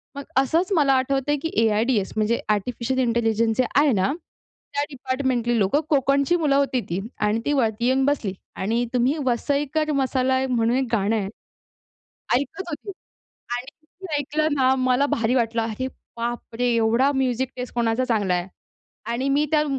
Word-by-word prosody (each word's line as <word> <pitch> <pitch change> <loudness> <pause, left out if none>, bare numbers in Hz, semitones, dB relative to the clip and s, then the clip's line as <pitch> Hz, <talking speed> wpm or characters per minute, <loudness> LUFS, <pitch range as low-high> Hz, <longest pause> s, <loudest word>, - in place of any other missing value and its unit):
मग 280 - -5
असंच 330 +8 +2
मला 280 -4 +4
आठवतं 270 +2 0
आहे, 295 - +2
की 325 +3 -3
ए-आय-डी-एस 220 -1 +1
म्हणजे 220 +2 +1
आर्टिफिशियल 240 +5 -1
इंटेलिजन्स 230 -2 +1
जे 255 - +4 0.2
आहे 290 -1 +4
ना, 190 +7 +1 0.6
त्या 285 0 0
डिपार्टमेंटली 260 -3 -1
लोकं 205 +10 +2
कोकणची 280 +3 +3
मुलं 300 -5 +2
होती 275 -3 +1
ती 175 +3 -1 0.3
आणि 215 +2 +1
ती 290 - +1
वरती 235 -4 +1
येऊन 260 +1 +3
बसली 255 -9 0 0.2
आणि 230 +5 0
तुम्ही 250 +5 +2
वसईकर 285 +5 0
मसाला 260 -2 +1
म्हणून 235 -1 +2
एक 265 - +1
गाणं 215 -1 +1
आहे. 205 -3 -1 1.1
ऐकत 280 +9 -1
होती 335 +6 -6 0.7
आणि 245 - -6 0.4
मी 370 -5 -6
ऐकलं 305 +2 0
ना 260 -1 +3
मला 255 +2 +2
भारी 235 -2 0
वाटलं, 230 -1 +1
अरे 225 +3 -3 0.3
बापरे! 240 +1 -3
एवढा 230 +5 +3
म्युझिक 260 -1 0
टेस्ट 250 0 -6
कोणाचा 235 +1 +1
चांगला 210 -6 +1
आहे 175 +1 -1 0.6
आणि 260 +4 -1
मी 290 +2 +2
त्या 305 -1 +4
255 Hz, 160 wpm, -23 LUFS, 230-280 Hz, 1.1 s, मला